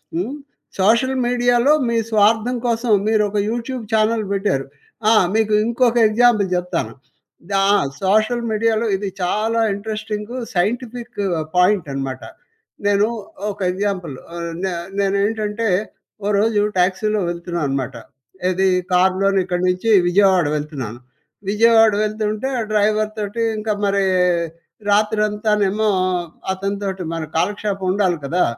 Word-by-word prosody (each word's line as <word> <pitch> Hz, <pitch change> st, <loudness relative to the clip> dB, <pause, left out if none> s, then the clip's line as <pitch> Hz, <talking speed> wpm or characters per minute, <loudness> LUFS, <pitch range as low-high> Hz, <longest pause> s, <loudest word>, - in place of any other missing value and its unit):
హ్మ్. 205 Hz, -, -2 dB, 0.4 s
సోషల్ 235 Hz, +7 st, +3 dB
మీడియాలో 245 Hz, +2 st, +3 dB, 0.2 s
మీ 235 Hz, -, 0 dB
స్వార్థం 220 Hz, +3 st, +3 dB
కోసం 235 Hz, 0 st, 0 dB, 0.2 s
మీరు 215 Hz, -1 st, +3 dB
ఒక 210 Hz, -, -3 dB
యూట్యూబ్ 240 Hz, +2 st, -4 dB
చానెల్ 220 Hz, 0 st, +2 dB
పెట్టారు. 195 Hz, -9 st, 0 dB, 0.5 s
ఆ! -, -, +6 dB, 0.2 s
మీకు 220 Hz, -1 st, +2 dB
ఇంకొక 235 Hz, 0 st, +2 dB
ఎగ్జాంపుల్ 220 Hz, -2 st, +3 dB
జెప్తాను. 180 Hz, -11 st, -2 dB, 0.6 s
దా 195 Hz, 0 st, +2 dB, 0.4 s
సోషల్ 215 Hz, +5 st, +2 dB
మీడియాలో 225 Hz, +1 st, +1 dB
ఇది 195 Hz, +1 st, -3 dB
చాలా 215 Hz, +5 st, 0 dB, 0.2 s
ఇంట్రెస్టింగు 215 Hz, +2 st, -5 dB, 0.2 s
సైంటిఫిక్ 235 Hz, +4 st, -2 dB, 0.3 s
పాయింటనమాట. 140 Hz, -9 st, +1 dB, 0.7 s
నేను 205 Hz, +1 st, +3 dB, 0.4 s
ఒక 205 Hz, -, -12 dB
ఎగ్జాంపులు 185 Hz, -7 st, -3 dB, 0.2 s
ఆహ్, 170 Hz, 0 st, -4 dB
నే 190 Hz, -, -1 dB, 0.3 s
నేనేంటంటే 210 Hz, +2 st, 0 dB, 0.6 s
ఓ -, -, 0 dB
రోజు 215 Hz, 0 st, +2 dB, 0.2 s
టాక్సీలో 195 Hz, +4 st, +1 dB
వెళ్తున్నాను 170 Hz, -4 st, -3 dB
మాట. 130 Hz, +1 st, -6 dB, 0.6 s
ఏది 185 Hz, +1 st, +1 dB, 0.3 s
కార్లోని 190 Hz, +2 st, +3 dB
ఇక్కడి 180 Hz, -1 st, -2 dB
నుంచి 180 Hz, +5 st, 0 dB, 0.2 s
విజయవాడ 190 Hz, -1 st, +4 dB
వెళ్తున్నాను. 140 Hz, -7 st, -5 dB, 0.5 s
విజయవాడ 225 Hz, +1 st, +5 dB
వెళ్తుంటే, 215 Hz, +2 st, -2 dB
ఆ -, -, 0 dB
డ్రైవర్ 215 Hz, 0 st, +2 dB
తోటి 215 Hz, +2 st, -2 dB
ఇంక 215 Hz, +1 st, -5 dB, 0.2 s
మరీ 200 Hz, 0 st, +1 dB, 0.9 s
రాత్రంతానేమో 210 Hz, 0 st, +1 dB, 0.6 s
అతనితోటి 195 Hz, 0 st, -3 dB
మన 165 Hz, -1 st, -3 dB
కాలక్షేపం 200 Hz, +2 st, -1 dB
ఉండాలి 190 Hz, -3 st, +1 dB
కదా! 175 Hz, +6 st, +1 dB
210 Hz, 115 wpm, -20 LUFS, 185-220 Hz, 0.9 s, ఆ